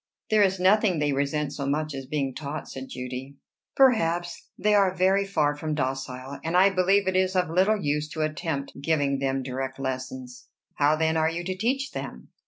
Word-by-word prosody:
"There 215 -1 +5
is 190 -2 +2
nothing 190 0 +4
they 150 -1 +1
resent 145 +1 -1
so 140 -2 -4
much 150 +2 -1
as 135 -1 -6
being 140 -2 -2
taught," 150 +2 -6
said 130 0 -7
Judy. 125 +2 -6 0.4
"Perhaps: 175 -10 +2
they 210 +1 +2
are 195 -2 +3
very 190 +2 +2
far 150 -6 +1
from 155 +1 -3
docile; 130 0 -4
and 165 +2 +1
I 195 +2 +6
believe 190 +1 +2
it 190 - +1
is 185 0 +2
of 180 -3 +1
little 190 +5 +3
use 150 -2 -1
to 155 - -1
attempt 155 -3 -3
giving 140 -3 +1
them 135 -1 -1
direct 130 +1 -4
lessons." 130 -1 -5 0.3
"How, 145 +1 +3
then, 160 0 +1
are 160 0 +2
you 170 +1 -4
to 185 +1 -3
teach 260 +7 -1
them?" - - -7
155 Hz, 190 wpm, -26 LUFS, 140-185 Hz, 0.4 s, I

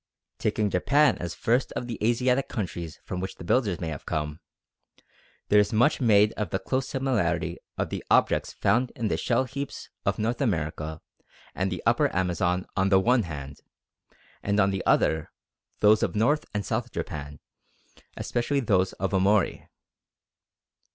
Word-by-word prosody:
Taking 105 -2 0
Japan 145 +11 +3
as 85 -1 -4
first 120 +3 +1
of - - -3
the 115 -3 -6
Asiatic 125 +3 +2
countries 85 - -5
from 90 - -4
which 95 +1 -4
the - - -10
builders 100 -1 +1
may 80 - -3
have 75 -3 -7
come, 75 0 -2 1.1
there 105 - +6
is 105 0 +2
much 120 +7 +3
made 105 -3 +5
of 105 -5 -4
the 95 - 0
close 130 +5 -2
similarity 90 - 0 0.2
of - - -2
the - - -4
objects - - +3
found 125 +2 +1
in 115 -3 -1
the - - +1
shell 120 +1 +1
heaps 140 +2 -6
of - - 0
North 115 +4 -1
America 80 - -2 0.5
and 95 +1 -1
the 90 - -4
upper - - +3
Amazon 90 0 0
on 95 0 +2
the 95 -1 +5
one 120 +5 +3
hand, 70 -6 -7 0.8
and 100 +1 0
on 100 -1 +4
the 95 - -3
other 80 -1 +2 0.5
those 105 +1 +5
of - - -1
North 135 +8 +2
and 105 -1 -3
South 120 +1 -2
Japan, 75 -1 -6 0.8
especially 125 +4 -1
those 95 -7 +1
of 95 - -3
Omori. 95 0 +2
100 Hz, 160 wpm, -26 LUFS, 90-120 Hz, 1.1 s, there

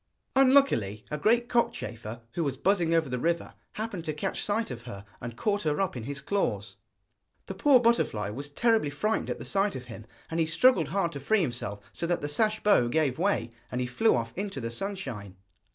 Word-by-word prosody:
Unluckily, 255 - +4
a 150 - -1
great 235 +6 +3
cockchafer, 120 - -2
who 170 - -1
was 135 -3 -2
buzzing 180 -4 +2
over 165 -2 +3
the 125 -1 -3
river, 170 +4 -1 0.2
happened 210 -5 -4
to 155 - -2
catch 185 +6 -3
sight 210 -4 -1
of 120 -2 -6
her, 100 -5 -8 0.2
and 120 0 -6
caught 205 - 0
her 150 +1 0
up 195 -6 0
in 115 -3 -5
his 140 +1 -4
claws. 200 +5 -1 0.7
The - - -5
poor 280 -3 +5
butterfly 230 - +1
was 140 +6 -6
terribly 220 +1 +2
frightened 210 +10 -1
at - - -2
the - - -8
sight 200 0 +1
of 125 - -6
him, 115 -2 -10 0.2
and 165 - -1
he 160 - +2
struggled 165 - +4
hard 170 +1 0
to 140 - -6
free 210 +9 +2
himself, 120 - -3
so 170 - -3
that 175 0 0
the - - 0
sash 215 +7 +1
bow 200 -13 +5
gave 140 +1 +1
way, 195 -9 +1 0.2
and 125 - -2
he 125 - 0
flew 175 - +2
off 115 -1 -2
into 195 -6 -4
the 115 -2 -4
sunshine. 120 - -5
160 Hz, 210 wpm, -28 LUFS, 125-205 Hz, 0.7 s, poor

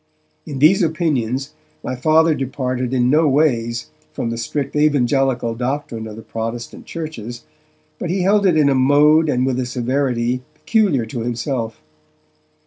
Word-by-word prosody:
In 145 -3 -5
these 160 +9 +5
opinions 150 -5 -1 0.3
my 130 - -3
Father 155 +5 +3
departed 130 -2 -3
in 125 -1 +2
no 155 +2 +4
ways 120 -5 0 0.2
from 115 - -3
the - - -3
strict 135 +6 -3
evangelical 135 -4 +2
doctrine 125 -2 -3
of 105 - -8
the 110 - -10
Protestant 115 +1 -6
churches, 120 -8 -6 0.6
but 175 - -3
he 185 +1 0
held 200 +1 +3
it 170 -4 +3
in 150 -2 +4
a - - +3
mode 145 +4 +4
and 125 -2 +1
with 130 -1 0
a 130 - -1
severity 125 -1 -1
peculiar 180 - +1
to 115 +2 -6
himself. 115 - -3
130 Hz, 150 wpm, -19 LUFS, 120-155 Hz, 0.6 s, these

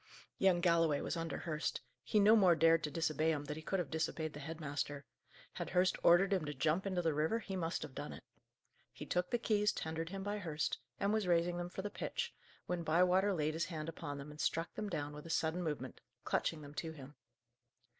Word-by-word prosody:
Young 185 -2 +4
Galloway 165 -4 +3
was - - -2
under 165 -1 -3
Hurst. 155 -2 -2 0.2
He 210 - +2
no 210 +2 +7
more 185 -6 +6
dared 165 0 +5
to - - -3
disobey 155 0 +1
him 145 -2 -1
than 150 - -4
he 160 - -7
could 195 +4 -1
have 175 -6 -3
disobeyed 160 -1 -1
the 150 - -7
head 160 +3 -6
master. 145 -1 -3 0.5
Had - - -4
Hurst 180 +1 +3
ordered 185 +3 +6
him 185 -4 +1
to 150 0 -4
jump 160 +8 +1
into 185 -2 0
the 160 -2 +2
river 155 +9 +1
he 205 -4 -5
must 170 -2 -2
have 135 - -8
done - - -5
it. - - -10 0.7
He - - -8
took 180 0 0
the 240 - +1
keys 210 -2 +2
tendered 160 +1 -4
him 195 +1 -5
by 205 +1 -2
Hurst, 160 -5 -2 0.2
and 200 +1 +1
was 215 -3 +1
raising 175 0 +2
them 175 0 -3
for 190 +1 -6
the 205 - -3
pitch, 475 - -3 0.3
when 180 -1 -2
Bywater 180 +5 +4
laid 155 -4 0
his 165 +1 0
hand 155 -3 -5
upon 145 -3 -5
them 140 +1 -8
and 150 - -7
struck 165 +1 0
them 210 -1 -4
down 145 -5 -3
with 150 +2 -9
a - - -9
sudden 165 +2 0
movement, 150 -6 -4 0.2
clutching 155 -2 0
them 145 0 -10
to 160 +1 -4
him. 140 -2 -11
165 Hz, 225 wpm, -36 LUFS, 155-185 Hz, 0.7 s, no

